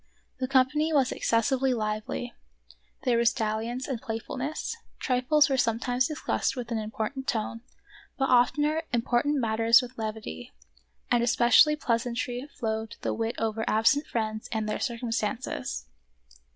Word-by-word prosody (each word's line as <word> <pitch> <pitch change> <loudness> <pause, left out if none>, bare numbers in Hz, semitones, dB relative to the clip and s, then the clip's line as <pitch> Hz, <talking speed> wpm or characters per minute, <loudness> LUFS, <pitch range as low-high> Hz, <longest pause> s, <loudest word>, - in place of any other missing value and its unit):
The 255 - -1
company 275 +4 +2
was 275 -5 +3
excessively 255 +3 +1
lively; 215 - -3 0.7
there 245 -3 +2
was 235 0 +4
dalliance 225 +2 -2
and 255 -5 -3
playfulness; 255 - -4 0.2
trifles 265 +4 +3
were 270 -2 0
sometimes 245 +2 +1
discussed 305 -2 -1
with 245 -2 -6
an 225 - 0
important 220 +5 -4
tone, 230 0 -2 0.6
but 270 - +1
oftener 295 +6 +3
important 240 +4 +1
matters 225 -1 +4
with 250 0 -6
levity; 215 - -5 0.6
and 240 -1 +4
especially 240 +5 +5
pleasantly 245 0 -2
flowed 220 -5 -4
the - - -1
wit 225 +1 -2
over 225 0 -1
absent 225 +7 +3
friends 215 -1 -3
and 220 -2 -1
their 210 - -2
circumstances. 230 - -3
240 Hz, 130 wpm, -27 LUFS, 225-265 Hz, 0.7 s, especially